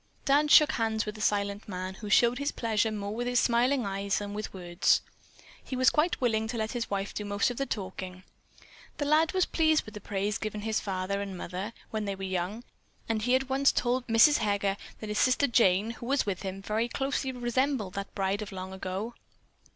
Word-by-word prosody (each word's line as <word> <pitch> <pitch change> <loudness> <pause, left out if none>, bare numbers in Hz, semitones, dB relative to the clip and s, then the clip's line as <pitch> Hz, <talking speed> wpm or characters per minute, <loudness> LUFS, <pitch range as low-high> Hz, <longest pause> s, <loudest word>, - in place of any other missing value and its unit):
Dan 290 +2 +4
shook 300 +1 +7
hands 220 -3 0
with 210 - -4
the 215 - -9
silent 200 -1 0
man, 185 0 -4
who 210 +2 -8
showed 240 +4 +4
his 285 +1 -1
pleasure 220 -1 0
more 205 -1 -4
with 240 +2 -3
his 245 0 +3
smiling 245 +3 +2
eyes 195 0 -1
than 205 0 -4
with 210 +1 -5
words. 175 -2 +1 0.6
He 260 - -5
was 255 0 +4
quite 315 +4 +1
willing 220 -3 +1
to 235 +1 -4
let 220 0 -2
his 240 -2 -3
wife 200 0 -2
do 210 - -4
most 205 +3 0
of 245 - -7
the 275 - -1
talking. 185 -2 -5 0.7
The 290 - -1
lad 310 +2 +3
was 370 -1 +3
pleased 315 -1 +2
with 215 - -11
the 210 - -8
praise 200 +1 -2
given 215 -1 -4
his 220 0 0
father 195 0 -2
and 195 -2 -5
mother, 190 +5 -5 0.2
when 215 -1 -2
they 200 -1 -2
were 195 - -8
young, 190 +4 -3 0.4
and 225 -1 0
he 245 +3 +3
at 265 0 0
once 270 +1 +3
told 245 +1 0
Mrs. 230 +6 +6
Heger 200 -2 0 0.3
that 215 - -5
his 210 - -1
sister 255 +2 +4
Jane, 220 -4 +3
who 235 0 -9
was 275 +1 +2
with 195 -3 -2
him, 195 0 -5
very 220 +3 0
closely 270 +1 -2
resembled 245 -4 -1
that 200 0 -6
bride 195 +1 0
of 210 0 -6
long 185 0 -6
ago. 190 +5 -4
215 Hz, 215 wpm, -29 LUFS, 200-245 Hz, 0.7 s, shook